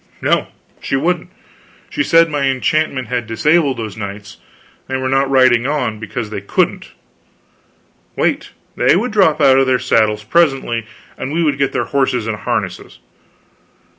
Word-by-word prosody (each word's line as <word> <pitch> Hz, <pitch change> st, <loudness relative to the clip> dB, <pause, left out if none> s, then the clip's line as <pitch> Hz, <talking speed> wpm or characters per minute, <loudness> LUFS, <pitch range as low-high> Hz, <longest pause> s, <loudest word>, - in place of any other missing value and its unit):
No, -, -, +1 dB, 0.3 s
she -, -, -2 dB
wouldn't. 175 Hz, +5 st, -1 dB, 0.6 s
She 300 Hz, -, -1 dB
said 165 Hz, -, +5 dB
that 165 Hz, -, -10 dB
my 145 Hz, -2 st, 0 dB
enchantment 135 Hz, -1 st, 0 dB
had 120 Hz, -2 st, -2 dB
disabled 150 Hz, +4 st, +2 dB
those 110 Hz, -3 st, -5 dB
knights; 100 Hz, +1 st, -8 dB, 0.5 s
they 130 Hz, -, -2 dB
were 130 Hz, 0 st, -2 dB
not 135 Hz, +1 st, +1 dB
riding 130 Hz, -2 st, +4 dB
on, 125 Hz, -7 st, -2 dB
because 115 Hz, 0 st, -5 dB
they 100 Hz, -2 st, -4 dB
couldn't; 100 Hz, -, -1 dB, 1.2 s
wait, -, -, -1 dB, 0.3 s
they -, -, +3 dB
would 220 Hz, +7 st, -1 dB
drop 160 Hz, -7 st, +3 dB
out 135 Hz, -2 st, +5 dB
of 135 Hz, -, +2 dB
their 130 Hz, -1 st, +3 dB
saddles 110 Hz, -3 st, +1 dB
presently, 135 Hz, -5 st, +1 dB, 0.3 s
and 130 Hz, -, -4 dB
we 170 Hz, +2 st, 0 dB
would 145 Hz, -3 st, 0 dB
get 140 Hz, -, +1 dB
their -, -, -1 dB
horses 130 Hz, -4 st, 0 dB
and 110 Hz, -1 st, -3 dB
harness. -, -, -4 dB
130 Hz, 160 wpm, -17 LUFS, 115-150 Hz, 1.2 s, said